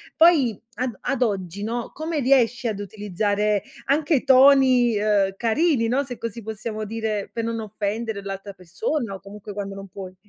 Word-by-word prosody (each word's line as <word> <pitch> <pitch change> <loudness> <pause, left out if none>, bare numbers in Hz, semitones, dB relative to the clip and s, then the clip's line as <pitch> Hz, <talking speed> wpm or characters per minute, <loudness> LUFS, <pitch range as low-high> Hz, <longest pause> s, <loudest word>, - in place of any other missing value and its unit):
poi 335 +2 +7 0.4
ad 255 +1 0
o 205 - -18
ad 270 -2 -2
oggi, 200 -4 -1
no, 230 +2 -3
come 315 +1 -3
riesci 250 -2 +3
ad 210 -2 -2
utilizzare 205 0 -1 0.2
anche 295 0 +2
toni, 260 -3 +6
uhm, 205 -2 +2
carini, 240 +1 +2
no, 265 +4 +1
se 245 -3 -7
così 230 0 -5
possiamo 215 0 -5
dire, 215 -1 -3
per 230 -1 -3
non 230 -1 -2
offendere 215 0 -3
l'altra 195 0 -6
persona 200 - -3
o 195 - -8
comunque 205 +1 -10
quando 195 -1 -5
non 195 0 -8
puoi? 185 0 -9
220 Hz, 170 wpm, -23 LUFS, 200-250 Hz, 0.4 s, poi